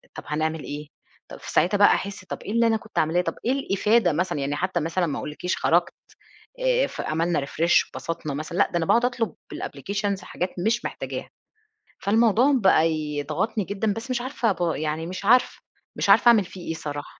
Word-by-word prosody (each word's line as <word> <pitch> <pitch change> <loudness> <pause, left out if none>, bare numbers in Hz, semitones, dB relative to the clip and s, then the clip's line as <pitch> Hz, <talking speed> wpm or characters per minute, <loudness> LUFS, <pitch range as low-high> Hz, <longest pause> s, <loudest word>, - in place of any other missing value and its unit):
طَب - - -7
هنعمل 155 +1 -2
إيه؟ 150 +1 -6 0.4
طَب - - -11
في - - -8
ساعتها 195 +4 +3
بقى 205 - +7
أحِس، 195 -1 -1
طَب - - -6
إيه - - -6
اللي 230 +1 +3
أنا 225 -1 +2
كنت 220 0 -5
عاملاه، 160 +3 +2
طَب - - -3
إيه 245 - +2
الإفادة 220 - +2
مثلًا؟ 170 -1 -1
يعني 140 +1 -1
حتى 185 +2 -1
مثلًا 170 +3 0
ما 145 -4 -3
أقولش 150 - -6
لِك 180 - 0
خرجت، 170 +2 +2 0.7
آآ - - +2
ف - - -6
عملنا 165 -2 0
refresh 165 +5 +2
واتبسطنا 160 -3 -5
مثل 155 +4 -5
لأ، 200 - +2
ده - - 0
أنا 165 - 0
باقعُد 235 +8 +3
أطلب 240 -2 -1 0.2
بالapplications 200 -1 -3
حاجات 180 0 -3 0.2
مش 230 +2 +1
محتاجاها. - - -5 0.7
فالموضوع 225 +3 +3
م 265 -4 +2
بقى 175 -4 +5
يضغطني 155 +8 -2
جدًا 200 +2 -1
بس 225 +5 -7
مش 245 -1 -1
عارفة 250 -3 0
ب 175 -2 0
يعني 155 +1 -2
مش 185 +2 -6
عارفة، 250 +4 +4 0.4
مش - - -1
عارفة - - +6
أعمل 225 -4 +6
فيه 180 0 -10
إيه 160 - -1
صراحة. 145 -2 -7
185 Hz, 200 wpm, -24 LUFS, 160-220 Hz, 0.7 s, بقى